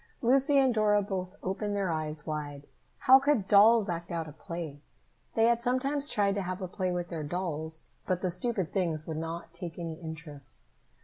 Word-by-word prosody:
Lucy 270 +4 +4
and 265 -2 +4
Dora 210 -2 +3
both 190 -1 -4
opened 205 +2 -2
their 195 -3 0
eyes 155 -1 -1
wide. 145 -2 -5 0.4
How 260 +1 +8
could 270 -8 +1
dolls 210 +2 +6
act 170 -1 -4
a 165 -3 -3
play? 160 -3 -6 0.5
They 225 - +4
had 235 0 +3
sometimes 275 +4 +1
tried 200 -3 +2
to 200 - -1
have 185 0 -4
a 185 - -4
play 185 0 -2
with 175 0 -3
their 165 -3 -4
dolls, 160 -1 -4 0.2
but 180 -1 0
the 185 - 0
stupid 190 -1 -1
things 165 -5 -1
would 160 -1 -4
not 165 +1 -5
take 170 -1 -7
any 165 -1 -6
interest. 150 - -9
180 Hz, 185 wpm, -29 LUFS, 160-210 Hz, 0.5 s, How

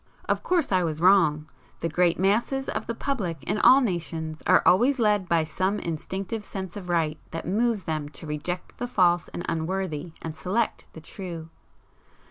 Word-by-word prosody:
Of - - +1
course 345 - +1
I 185 -1 +3
was 155 -2 -2
wrong; 170 -5 +4 0.4
the 165 - 0
great 170 +1 +2
masses 230 +8 +1
of - - -3
the 230 - -2
public 185 - -3
in 210 - -1
all 265 +5 +7
nations 165 - -3
are - - +5
always 245 +10 +5
led 210 -5 +2
by 165 -2 +3
[p 155 - -15
173] - - -18
some 195 +3 +1
instinctive 195 +7 -4
sense 190 -3 -6
of 190 -3 -7
right, 160 -3 0
that 165 - -5
moves 220 +1 +1
them 155 -2 -3
to 150 +2 -10
reject 155 +4 -5
the 245 - -2
false 175 -7 +3
and 175 - -6
unworthy, 165 -1 -2
and 160 -1 -5
select 210 +7 -1
the 160 - -10
true. 165 -1 -7
180 Hz, 185 wpm, -26 LUFS, 160-210 Hz, 0.4 s, all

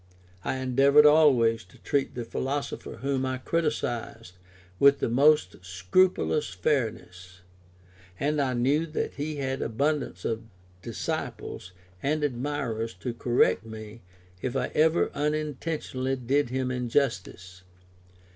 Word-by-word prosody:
I - - -1
endeavoured 135 +3 +4
always 130 -7 +5
to - - -20
treat 140 -1 -1
the 120 -1 -4
philosopher 140 +5 -3
whom 135 -1 0
I 130 0 -1
criticized 130 - -2 0.5
with 140 0 +6
the - - -1
most 135 -8 +3
scrupulous 95 - +1
fairness; 90 -5 -3 0.8
and 150 +1 +1
I 130 -2 0
knew 140 +7 +1
that 155 - -3
he 150 +2 -4
had 135 -1 -3
abundance 140 +5 -1
of 115 -1 -1 0.4
disciples 90 0 -5 0.3
and 150 +2 0
admirers 125 -4 -2
to 125 - -5
correct 115 -5 +2
me 110 0 -9 0.4
if 130 0 -3
I 135 - 0
ever 160 +2 +3
unintentionally 150 -2 -2
did 130 +1 0
him 130 0 -1
injustice. 115 -8 -2
130 Hz, 120 wpm, -27 LUFS, 115-145 Hz, 0.8 s, with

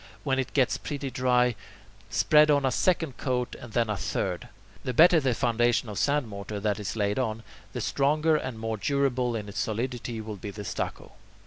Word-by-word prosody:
When 135 -2 +1
it 130 - -3
gets 130 -3 +2
pretty 140 -2 -4
dry, 125 -1 +2 0.6
spread 150 0 +5
on 145 -2 +3
a 130 - +2
second 165 -6 +1
coat 125 -2 -2
and 120 -3 -11
then 120 -2 +2
a 105 - -1
third. 90 - -3 0.3
The 125 - -3
better 165 +3 +7
the 130 -5 0
foundation 120 0 +1
of 100 -3 -4
sand 145 -3 +1
mortar 100 0 -6
that 105 0 -1
is 105 0 -4
laid 105 +1 0
on, 115 -3 -2 0.3
the - - -3
stronger 150 +3 +2
and 130 -6 -3
more 110 0 -3
durable 130 0 0
in 105 -2 -4
its 100 - -5
solidity 120 +1 -3
will 110 -1 -6
be 100 - -7
the 105 +1 -7
stucco. - - -4
125 Hz, 195 wpm, -27 LUFS, 110-140 Hz, 0.6 s, better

